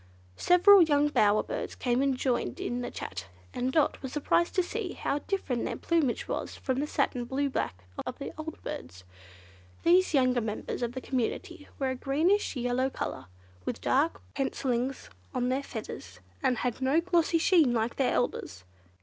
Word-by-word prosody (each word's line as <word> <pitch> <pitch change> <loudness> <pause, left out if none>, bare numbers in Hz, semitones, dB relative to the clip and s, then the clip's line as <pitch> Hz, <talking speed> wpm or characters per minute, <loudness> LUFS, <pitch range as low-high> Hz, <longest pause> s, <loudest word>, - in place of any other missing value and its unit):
Several 370 +2 +7
young 295 -2 +4
bower 210 -6 +3
birds - - -4
came 245 0 +1
and 275 -2 +1
joined 250 -2 -1
in 245 +1 -2
the 245 - -3
chat, 90 -1 -6 0.3
and 255 +1 -1
Dot 305 +1 +2
was 265 - -5
surprised 325 +4 +1
to 370 - +3
see 400 0 -4
how 285 - -1
different 285 - -2
their - - -3
plumage 320 -8 0
was - - -3
from 260 -1 -2
the 295 - -1
satin 265 -4 0
blue 275 +3 -1
black 95 - -3 0.2
of 255 - -4
the 275 - -6
old 315 0 -7
birds. 90 +2 -7 0.8
These 355 -1 +4
younger 255 -2 +3
members 215 +2 -4
of 240 0 -2
the 260 - -5
community 260 +3 -3
were 265 -1 0
of 260 - -6
a - - -19
greenish 330 +10 +2
yellow 250 +1 0
colour, 95 - -5 0.4
with 240 - -3
dark 295 +5 +1
pencillings 265 -1 -2 0.3
on 250 0 +1
their 260 +2 +1
feathers, 155 - -8 0.2
and 250 - +2
had 250 +2 -2
no 270 +5 +3
glossy 335 -1 +2
sheen 325 -5 +4
like 230 0 -1
their 265 - +2
elders. 90 - -2
265 Hz, 175 wpm, -29 LUFS, 245-310 Hz, 0.8 s, Several